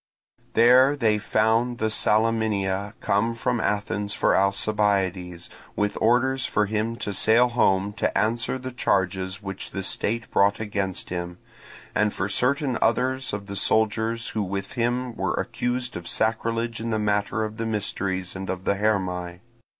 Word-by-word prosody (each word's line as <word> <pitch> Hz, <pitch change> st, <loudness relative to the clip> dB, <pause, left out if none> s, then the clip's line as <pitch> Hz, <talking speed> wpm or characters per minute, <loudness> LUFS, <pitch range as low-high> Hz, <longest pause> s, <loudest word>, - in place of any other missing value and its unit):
There 130 Hz, +4 st, +6 dB
they 110 Hz, -6 st, +2 dB
found 110 Hz, +3 st, +1 dB
the 110 Hz, -1 st, 0 dB
Salaminia 105 Hz, -3 st, +1 dB
come 115 Hz, +4 st, +1 dB
from 120 Hz, 0 st, -1 dB
Athens 105 Hz, 0 st, -1 dB
for -, -, +2 dB
Alcibiades, 100 Hz, -3 st, 0 dB, 0.3 s
with 105 Hz, 0 st, 0 dB
orders 125 Hz, +3 st, +2 dB
for 105 Hz, -, +1 dB
him 110 Hz, +2 st, -1 dB
to 105 Hz, -3 st, -4 dB
sail 115 Hz, +5 st, +4 dB
home 100 Hz, -4 st, +2 dB
to -, -, 0 dB
answer 115 Hz, +4 st, 0 dB
the 130 Hz, 0 st, -6 dB
charges 95 Hz, -4 st, -1 dB
which 95 Hz, -1 st, -6 dB
the 95 Hz, -, -5 dB
state 110 Hz, +4 st, -2 dB
brought 100 Hz, +1 st, +3 dB
against 100 Hz, -3 st, -3 dB
him, 90 Hz, -1 st, -4 dB, 0.6 s
and 105 Hz, 0 st, +2 dB
for 100 Hz, -, -2 dB
certain 130 Hz, +4 st, +1 dB
others 130 Hz, +3 st, +1 dB
of 100 Hz, 0 st, -4 dB
the 100 Hz, 0 st, -7 dB
soldiers 110 Hz, +3 st, 0 dB
who 110 Hz, -, -2 dB
with 100 Hz, 0 st, -4 dB
him 120 Hz, 0 st, -1 dB
were -, -, -1 dB
accused 125 Hz, 0 st, -2 dB
of 90 Hz, -1 st, -6 dB
sacrilege 115 Hz, +1 st, -1 dB
in 115 Hz, +1 st, -3 dB
the 110 Hz, -, 0 dB
matter 105 Hz, +1 st, 0 dB
of 110 Hz, 0 st, -5 dB
the 115 Hz, -1 st, -2 dB
mysteries 95 Hz, -4 st, -2 dB
and 95 Hz, 0 st, -6 dB
of 95 Hz, 0 st, -3 dB
the -, -, +2 dB
Hermae. 90 Hz, -4 st, -1 dB
105 Hz, 155 wpm, -25 LUFS, 100-115 Hz, 0.6 s, There